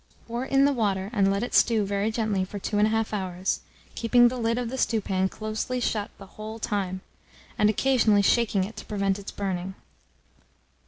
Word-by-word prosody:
Pour 235 +2 -4
in 275 +1 +3
the 285 - +3
water, 200 -4 -1
and 195 -3 +3
let 200 +2 0
it 245 - -5
stew 225 -3 +4
very 200 +2 0
gently 215 -4 0
for 185 +2 -6
2 205 - -4
1/2 220 +1 +1
hours, 185 -2 -2 0.3
keeping 240 +1 +4
the 255 - -5
lid 230 0 0
of 245 -2 -2
the 265 - -4
stewpan 195 -4 +1
closely 215 +5 -3
shut 215 -4 -1
the 195 - -11
whole 215 +3 -8
time, 190 -4 -2 0.5
and 210 - +3
occasionally 220 -3 +3
shaking 210 -2 +2
it 210 +4 -6
to - - -8
prevent 200 -1 -1
its 200 - -8
burning. 190 -1 -4
210 Hz, 180 wpm, -26 LUFS, 195-230 Hz, 0.5 s, stew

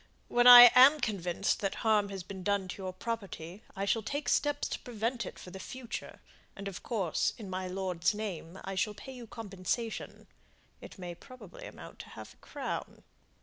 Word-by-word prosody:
When 240 0 +4
I 245 -1 +12
am 275 +4 +8
convinced 195 -5 -1
that 195 -1 -2
harm 210 -2 +3
has 195 -2 -6
been 190 +1 -8
done 200 0 0
to 195 - -7
your 185 -1 -4
property, 190 -3 -6
I 195 - -2
shall 225 +3 +1
take 285 +7 -3
steps 290 -1 +1
to - - -4
prevent 235 +1 -3
it - - -9
for 180 - -11
the 190 - -9
future, 255 +3 -7 0.3
and 200 0 -7
of 195 -2 -7
course, 195 -8 -1
in 205 -4 -8
my 185 0 -3
lord's 185 0 -1
name, 190 -5 -6
I 195 - -5
shall 210 +2 -1
pay 265 - -10
you 245 -2 -10
compensation 220 +2 -5 0.6
it - - -11
may 180 -2 -6
probably 255 - -12
amount - - -12
to - - -10
half - - -11
a - - -30
crown." - - -6
200 Hz, 190 wpm, -31 LUFS, 185-235 Hz, 0.6 s, I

